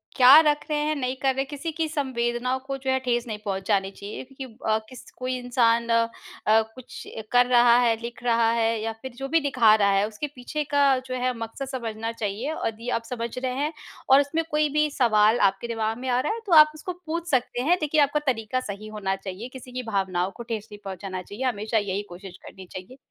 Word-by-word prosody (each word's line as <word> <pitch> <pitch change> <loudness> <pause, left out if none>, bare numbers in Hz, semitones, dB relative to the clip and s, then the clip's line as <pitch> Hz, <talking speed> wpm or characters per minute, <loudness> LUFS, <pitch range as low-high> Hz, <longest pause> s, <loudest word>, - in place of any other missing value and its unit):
क्या 260 +4 +9
रख 300 -1 +3
रहे 300 -1 0
हैं 305 0 0
नहीं 255 -2 -2
कर 270 -1 +2
रहे, 270 - 0
किसी 300 +3 -5
की 325 -1 0
संवेदनाओं 255 -3 -1
को 275 0 -3
जो 265 0 -4
है 265 - +2
ठेस 240 0 0
नहीं 215 -1 -4
पहुँचानी 195 0 0
चाहिए 200 +4 -8
क्यों 265 0 -10 0.3
अ, - - +3
किस 255 - -12
कोई 255 0 -2
इंसान 235 -1 +2
अ, 230 0 +3 0.4
कुछ 225 +3 0 0.3
कर 245 0 +5
रहा 240 -1 +5
है, 235 -2 +3
लिख 235 +1 -8
रहा 230 -1 +3
है 230 -1 +1
या 225 0 -2
फिर 260 - -7
जो 270 +2 -5
भी 330 - +4
दिखा 250 -7 +4
रहा 200 -2 +3
है, 195 +2 +2
उसके 220 +7 -5
पीछे 295 +5 -4
का 280 -2 +4
जो 255 0 -4
है 255 0 +1
मकसद 230 +4 -5
समझना 230 -4 -4
चाहिए। 230 +6 -3
यदि 225 +2 -4
आप - - -21
समझ 235 -1 -3
रहे 255 0 -2
हैं 295 +3 -1 0.4
और 270 +1 +8
उसमें 320 +4 -1
कोई 300 0 +2
भी 300 0 +2
सवाल 220 -3 +3
आपके 235 - -8
दिमाग 225 -1 -2
में 260 +1 -6
आ 245 0 +2
रहा 300 +11 0
है 460 - -5
तो 370 - 0
आप 305 0 +9
उसको 355 +4 -5
पूछ 335 +2 -3
सकते 245 -1 0
हैं। 340 +7 +3
देखिए, 305 0 +2
आपका 290 +1 +2
तरीका 230 0 0
सही 210 -2 -7
होना 200 -3 -2
चाहिए। 195 +4 -7
किसी 255 -1 -10
की 250 0 -4
भावनाओं 190 -4 -1
को 235 - -7
ठेस 225 -2 -5
नहीं 205 - -10
पहुँचाना 190 -1 -5
चाहिए, 205 +8 -7
हमेशा 220 -1 -1
यही 200 -1 -1
कोशिश 185 0 -10
करनी 190 -1 -11
चाहिए। 185 +9 -9
240 Hz, 225 wpm, -25 LUFS, 220-270 Hz, 0.4 s, क्या